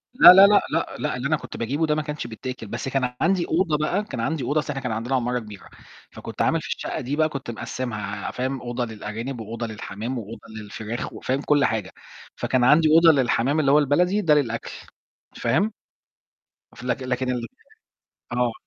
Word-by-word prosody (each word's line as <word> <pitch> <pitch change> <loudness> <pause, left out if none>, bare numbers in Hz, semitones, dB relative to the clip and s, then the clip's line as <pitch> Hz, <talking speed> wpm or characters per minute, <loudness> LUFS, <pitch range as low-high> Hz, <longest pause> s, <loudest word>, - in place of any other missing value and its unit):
لا، 185 - +11
لا، 195 +1 +9
لأ، 205 0 +5
لأ، - - -1
لأ، 150 -3 -1
اللي 125 +2 -2
أنا 155 - +2
كنت - - -9
باجيبُه 140 +8 0
ده 150 -1 +1
ما 155 - 0
كانش 150 0 -5
بيتاكل، 120 0 -7
بس 100 - -5
كان 130 -2 -1
عَندي 175 +1 +2
أوضة 160 -2 +1
بقى 175 +7 0
كان 130 - -7
عَندي 150 +4 -1
أوضة، 150 +2 +1
اصل 150 - -5
إحنا 135 -2 -3
كان 125 -2 -3
عَندنا 115 +4 -1
عمارة 125 0 0
كبيرة، 105 -4 -11 0.4
فكنت - - -7
عامل - - +2
في - - -8
الشقة - - -4
دي 135 +4 -3
بقى 155 +1 +2
كنت 140 -5 -5
مقسمها، 105 -4 -5
فاهم، 130 +1 -3
أوضة 120 0 -3
للأرانب، 110 +3 -6
وأوضة 115 +1 -5
للحَمَام، 110 +3 -5
وأوضة 115 0 -7 0.2
للفراخ، 110 +2 -6
وفاهم، 135 +2 -2
كُلّ 145 -2 +3
حاجة. 105 -6 -2 0.4
فكان 130 -2 0
عندي 150 +5 +5
أوضة 165 +1 +7
للحَمَام 130 +4 +1
اللي 140 -3 +3
هو 150 - +6
البلدي، 175 +8 +2
ده 160 -6 +4
للأكل، 115 -6 0 0.6
فاهم؟ 205 +6 +1 1.0
ف - - -12
لك 125 +1 -2
لكن 125 0 -1
ال 120 -2 -3 0.9
آه. 120 -1 +1
130 Hz, 195 wpm, -24 LUFS, 115-150 Hz, 1.0 s, لا